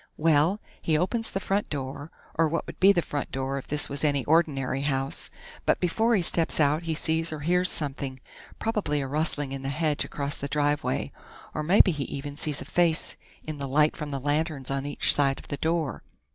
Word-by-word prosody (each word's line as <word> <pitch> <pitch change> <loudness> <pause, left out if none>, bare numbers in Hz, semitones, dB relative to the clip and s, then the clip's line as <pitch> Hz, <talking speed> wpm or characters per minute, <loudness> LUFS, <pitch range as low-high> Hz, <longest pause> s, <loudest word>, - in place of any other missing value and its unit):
Well, 160 +5 +3 0.2
he 155 -2 +1
opens 225 +7 0
the 195 - -2
front 195 +1 -1
door, 140 +1 -5 0.2
or 165 0 +2
what 165 - -2
would - - -10
be 195 +2 +7
the 175 -4 +1
front 145 -1 -4
door 135 +1 -2
if - - -12
this 150 0 0
was 140 +1 -3
any 140 -3 +1
ordinary 140 -5 +1
house, 135 -1 -1 0.3
but - - +2
before 225 +6 +2
he 190 - +2
steps 165 0 +3
out 150 +1 +3
he 165 -2 -2
sees 160 +1 +1
or 155 -2 -5
hears 180 +4 +3
something 135 -3 0 0.4
probably 205 -10 -1
a 135 - -3
rustling 145 -1 0
in 135 0 -5
the 135 - -3
hedge 150 +1 0
across 140 0 -3
the 140 - -4
driveway, 145 -2 0 0.4
or 155 - -2
maybe 185 +4 +5
he 145 -4 -3
even 140 +1 -6
sees 150 -1 -2
a - - -7
face, 170 -2 +2 0.3
in 155 -2 -6
the 140 - -3
light 150 +3 +3
from 150 -2 -5
the 140 - -3
lanterns 145 -1 -1
on 135 +1 -2
each 145 - +3
side 140 -2 +2
of - - -13
the 145 - -3
door. 160 -2 -1
150 Hz, 210 wpm, -27 LUFS, 140-165 Hz, 0.4 s, be